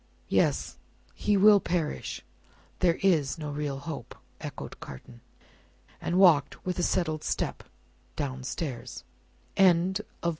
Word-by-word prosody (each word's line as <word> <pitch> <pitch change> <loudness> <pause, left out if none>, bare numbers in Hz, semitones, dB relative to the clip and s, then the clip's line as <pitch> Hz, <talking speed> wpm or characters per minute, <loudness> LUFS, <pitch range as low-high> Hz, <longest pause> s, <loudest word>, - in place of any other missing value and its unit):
"Yes. - - +1 0.4
He 205 - +1
will 205 +1 +7
perish: 165 - -2 0.6
there 170 -2 +3
is 160 -8 +3
no 150 -2 -5
real 145 -1 -3
hope," 145 +2 -7 0.2
echoed - - -7
Carton. 60 -2 -11 0.8
And 175 - 0
walked 170 -7 +4
with 180 -1 -2
a - - +2
settled 155 -3 0
step, - - -2 0.5
down 130 -3 -3
stairs. 135 -2 -5 0.5
CHAPTER 190 +2 +4 0.2
XII. - - +4
165 Hz, 120 wpm, -28 LUFS, 145-185 Hz, 0.8 s, will